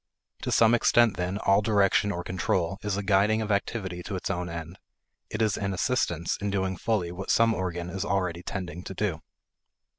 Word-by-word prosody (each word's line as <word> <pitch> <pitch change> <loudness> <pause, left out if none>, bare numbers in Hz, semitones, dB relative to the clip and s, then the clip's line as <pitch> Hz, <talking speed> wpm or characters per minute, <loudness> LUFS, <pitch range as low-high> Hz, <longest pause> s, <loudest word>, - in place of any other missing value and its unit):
To - - -2
some 115 0 +5
extent, 120 -1 +4
then, 90 +2 -2
all 100 0 +3
direction 105 -1 +3
or 90 -2 -4
control 95 +1 -1
is 105 -2 -2
a 100 - -2
guiding 100 +2 +3
of 110 -1 -2
activity 95 -3 -2
to 100 +2 -5
its 95 - -3
own 90 -1 -3
end; 85 +1 -7 0.5
it 110 +1 -1
is 110 - +1
an 100 -1 -2
assistance 85 -6 0
in 100 - -1
doing 95 -1 -1
fully 90 -3 -1
what 95 +2 -7
some 115 0 +4
organ 90 -3 -3
is 95 +1 -3
already 90 -4 -1
tending 90 -2 -5
to 95 - -6
do. 90 -5 -1
95 Hz, 190 wpm, -27 LUFS, 90-105 Hz, 0.5 s, some